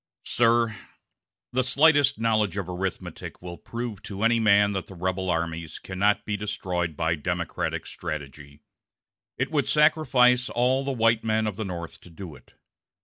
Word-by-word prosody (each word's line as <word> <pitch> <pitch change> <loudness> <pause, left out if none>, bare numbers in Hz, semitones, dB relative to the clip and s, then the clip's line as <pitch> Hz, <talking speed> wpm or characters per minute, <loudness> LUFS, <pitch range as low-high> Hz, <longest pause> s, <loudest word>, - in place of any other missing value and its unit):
"Sir, 115 -1 +2 0.8
the 130 - +2
slightest 145 0 +4
knowledge 110 -4 +1
of 95 -3 -3
arithmetic 90 +1 -5
will 85 -1 -9
prove 115 -3 -6
to 100 -1 -6
any 115 0 +4
man 105 -2 +4
that 95 -2 -4
the 95 - -11
rebel 95 +1 -2
armies 85 -1 -2
cannot 100 +2 0
be 105 - -2
destroyed 90 -5 -3
by 80 0 +1
Democratic 75 -3 -3
strategy. 75 -3 -7 0.7
It 130 +4 -1
would 145 -3 +1
sacrifice 125 -5 +4
all 130 +3 +1
the 135 - -2
white 115 -2 +2
men 110 0 +1
of 105 -3 -2
the 110 +1 -4
North 85 -3 -7
to - - -15
do 85 -1 -9
it. 65 - -18
105 Hz, 155 wpm, -26 LUFS, 90-120 Hz, 0.8 s, slightest